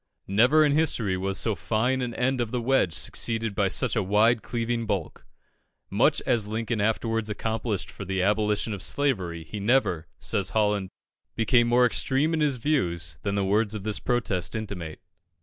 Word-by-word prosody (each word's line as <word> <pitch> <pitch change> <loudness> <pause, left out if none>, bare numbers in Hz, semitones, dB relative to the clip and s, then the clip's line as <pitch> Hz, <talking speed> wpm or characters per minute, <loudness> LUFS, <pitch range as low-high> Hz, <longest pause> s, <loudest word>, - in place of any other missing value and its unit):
Never 125 +10 +4
in 145 - +2
history 140 -10 +1
was 95 +1 -2
so 110 +2 0
fine 110 +9 0
an 120 -2 -3
end 130 0 0
of 120 - -2
the 125 +1 -2
wedge 120 -8 +2
succeeded 115 - -1
by 100 -1 +1
such - - -1
a - - +2
wide 110 +4 +3
cleaving 115 -1 -2
bulk. 95 -6 -3 0.6
Much - - +3
as 110 -3 +1
Lincoln 110 0 -2
afterwards 110 +1 0
accomplished 110 -1 -3
for - - -8
the 95 0 -2
abolition 105 +1 +1
of 100 - -6
slavery, 95 - -1
he 105 +7 -7
never, 100 - +1
says 100 -4 -2
Holland, 105 -3 +1 0.5
became 120 +1 +3
more 125 +1 +4
extreme 135 +6 +1
in 160 - +1
his 145 -3 +2
views 85 - -1
than 100 -1 -2
the 100 -1 +1
words 105 +2 +1
of 105 - -5
this 110 0 -2
protest 115 -6 -1
intimate. 95 -8 -5
110 Hz, 175 wpm, -26 LUFS, 100-120 Hz, 0.6 s, Never